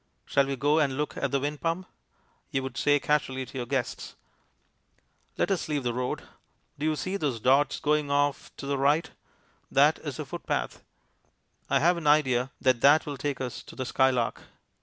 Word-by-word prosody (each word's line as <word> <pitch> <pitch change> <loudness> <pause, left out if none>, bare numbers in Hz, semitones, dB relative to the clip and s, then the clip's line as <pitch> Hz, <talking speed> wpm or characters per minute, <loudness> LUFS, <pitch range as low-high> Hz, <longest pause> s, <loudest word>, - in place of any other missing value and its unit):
"Shall 140 -1 +2
we 135 - -1
go 145 +4 +2
and 140 -4 +1
look 150 0 -2
at - - -1
the 140 - +1
wind 145 +2 -3
pump?" 170 +3 -1 0.6
you 135 - -1
would 130 -2 -6
say 145 +3 +3
casually 135 -3 0
to - - -14
your 120 - -4
guests. 130 -2 -3 1.2
Let - - +1
us 185 -4 -1
leave 145 -3 -1
the 120 -1 -1
road. 125 +1 -3 0.6
Do 150 - 0
you 155 - +1
see 185 +5 -3
those 140 -10 -2
dots 135 +4 +3
going 150 -1 +1
off 145 0 0
to - - -7
the 140 -1 -1
right? 145 +4 +2 0.6
That - - +4
is - - -6
a - - -4
footpath. - - -4 0.9
I - - +4
have 175 +3 +4
an 160 -3 -3
idea 130 -4 +3
that 130 -3 +2
that 145 +3 +6
will 145 - -4
take 140 -1 -3
us 125 -2 -4
to - - -13
the 130 - -4
skylark. 130 -2 +1
140 Hz, 190 wpm, -27 LUFS, 130-150 Hz, 1.2 s, that